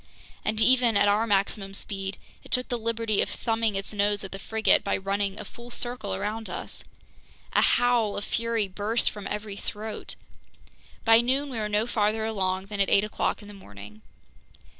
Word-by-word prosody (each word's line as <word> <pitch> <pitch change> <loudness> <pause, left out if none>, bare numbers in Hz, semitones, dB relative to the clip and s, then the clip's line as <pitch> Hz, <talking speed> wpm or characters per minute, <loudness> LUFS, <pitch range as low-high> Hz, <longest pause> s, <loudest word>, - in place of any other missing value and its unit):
And 215 +1 0
even 240 -2 +5
at 205 - +4
our 210 +3 +3
maximum 195 -1 0
speed, 195 -1 -3 0.3
it - - -14
took 250 0 +1
the 245 -2 -1
liberty 225 -2 0
of - - 0
thumbing 225 -2 0
its 195 +2 -3
nose 205 0 +1
at 195 - -7
the 195 - -6
frigate 220 +2 +3
by - - +1
running 195 +1 -1
a - - -6
full 240 0 -11
circle 240 - -3
around 220 - -3
us! - - -6 0.7
A - - +5
howl 240 -4 +3
of 205 - -3
fury 230 -2 0
burst 205 +5 0
from 205 -2 -7
every 210 -1 -4
throat! 215 +1 -5 0.9
By 225 0 +7
noon 270 +4 0
we 235 - -3
were 210 -1 -2
no 210 +1 +2
farther 220 -2 +1
along 190 -3 -1
than 205 0 -6
at 195 - +3
eight 200 - +5
o'clock 210 0 -1
in - - -12
the 205 - -10
morning. 105 - -12
210 Hz, 185 wpm, -27 LUFS, 200-230 Hz, 0.9 s, By